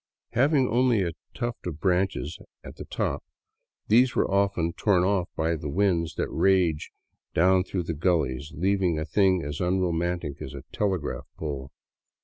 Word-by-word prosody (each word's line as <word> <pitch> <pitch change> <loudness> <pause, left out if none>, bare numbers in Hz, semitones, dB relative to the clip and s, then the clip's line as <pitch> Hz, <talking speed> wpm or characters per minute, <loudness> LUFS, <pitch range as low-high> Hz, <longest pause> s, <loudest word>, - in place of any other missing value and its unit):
Having 135 +2 +3
only 120 -4 +3
a 85 - -1 0.2
tuft 120 -5 -4
of 80 -3 -5
branches 90 -4 0 0.2
at - - -10
tli^ - - -10
top, - - -2 0.6
these 120 +4 +4
were - - +2
often 100 -4 +1
torn 95 -3 +2
off 95 -2 +1
by 80 +1 0
the 75 -2 -5
winds 85 -1 +1
that - - -1
rage 90 -5 +2 0.5
down 90 +2 +4
through 90 -1 -3
the 85 - -3
gullies, 75 -4 0
leaving 95 0 +1
a 80 - -2
thing 95 -2 +2
as 75 +3 -4
unromantic 85 -4 -1
as 65 - -6
a 70 - -8
telegraph 95 -7 -2
pole. 70 -3 -5
90 Hz, 155 wpm, -26 LUFS, 80-100 Hz, 0.6 s, these